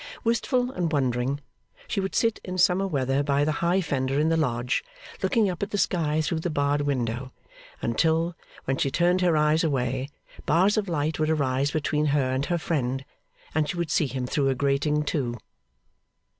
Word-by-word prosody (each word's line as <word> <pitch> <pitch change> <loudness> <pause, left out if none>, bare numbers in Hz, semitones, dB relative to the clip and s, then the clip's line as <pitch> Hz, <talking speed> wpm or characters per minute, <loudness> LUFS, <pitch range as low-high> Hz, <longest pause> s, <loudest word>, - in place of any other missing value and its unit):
Wistful 245 +2 +1
and 175 -8 -2
wondering, 130 -1 0 0.5
she 210 - -1
would 195 0 -2
sit 230 -1 +2
in 185 0 -5
summer 185 +2 +3
weather 135 -4 0
by 145 0 +1
the 155 - +1
high 175 +3 +2
fender 135 -4 -1
in 155 +2 +2
the 165 - +2
lodge, 125 -6 0 0.4
looking 225 -5 +2
up 180 -2 -3
at 200 - -1
the 205 - -2
sky 160 -5 +1
through 160 +1 -1
the 175 - -2
barred 145 -1 +1
window, 130 -3 -2 0.5
until, 160 +7 +1 0.3
when 135 0 0
she 135 - +1
turned 175 +5 +2
her 175 -3 +3
eyes 150 +2 +3
away, 130 -3 -1 0.4
bars 190 +5 +4
of 210 -3 -1
light 155 -1 -1
would 155 0 +1
arise 140 -3 +1
between 150 0 0
her 140 -3 +1
and 130 +2 -1
her 175 - +1
friend, 135 -5 -2 0.5
and 150 -1 +1
she 175 - -3
would 170 -3 -2
see 150 - +2
him 130 0 -3
through 135 +2 +1
a 135 - +1
grating, 140 +3 +1
too. 130 -5 -2
150 Hz, 185 wpm, -26 LUFS, 135-170 Hz, 0.5 s, bars